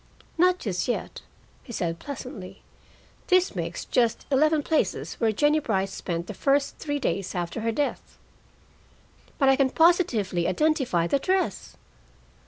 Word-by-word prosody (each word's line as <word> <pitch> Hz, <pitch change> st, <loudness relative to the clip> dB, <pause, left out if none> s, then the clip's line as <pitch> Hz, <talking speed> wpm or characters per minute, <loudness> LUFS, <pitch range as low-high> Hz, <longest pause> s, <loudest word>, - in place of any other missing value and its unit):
"Not 360 Hz, +2 st, +4 dB
just 185 Hz, -, -3 dB
yet," 245 Hz, -, -3 dB, 0.4 s
he 245 Hz, -, -12 dB
said 170 Hz, -6 st, -2 dB
pleasantly. 210 Hz, -8 st, -8 dB, 0.6 s
"This 370 Hz, -1 st, +3 dB
makes -, -, -4 dB
just 235 Hz, -3 st, +1 dB
eleven 305 Hz, +2 st, +3 dB
places 315 Hz, +1 st, 0 dB
where 225 Hz, -2 st, +2 dB
Jennie 295 Hz, +8 st, +2 dB
Brice 195 Hz, -7 st, -1 dB
spent 170 Hz, -1 st, -4 dB
the 210 Hz, -, -7 dB
first 275 Hz, +6 st, 0 dB
three 290 Hz, -1 st, -2 dB
days 195 Hz, -9 st, -2 dB
after 175 Hz, +5 st, -3 dB
her 230 Hz, +1 st, 0 dB
death." 285 Hz, +5 st, -3 dB, 1.2 s
"But 275 Hz, -, +3 dB
I 270 Hz, -, +6 dB
can 270 Hz, -1 st, +2 dB
positively 255 Hz, -, +2 dB
identify 280 Hz, -, +1 dB
the 275 Hz, +11 st, +1 dB
dress." 375 Hz, +5 st, -1 dB
260 Hz, 140 wpm, -26 LUFS, 195-305 Hz, 1.2 s, I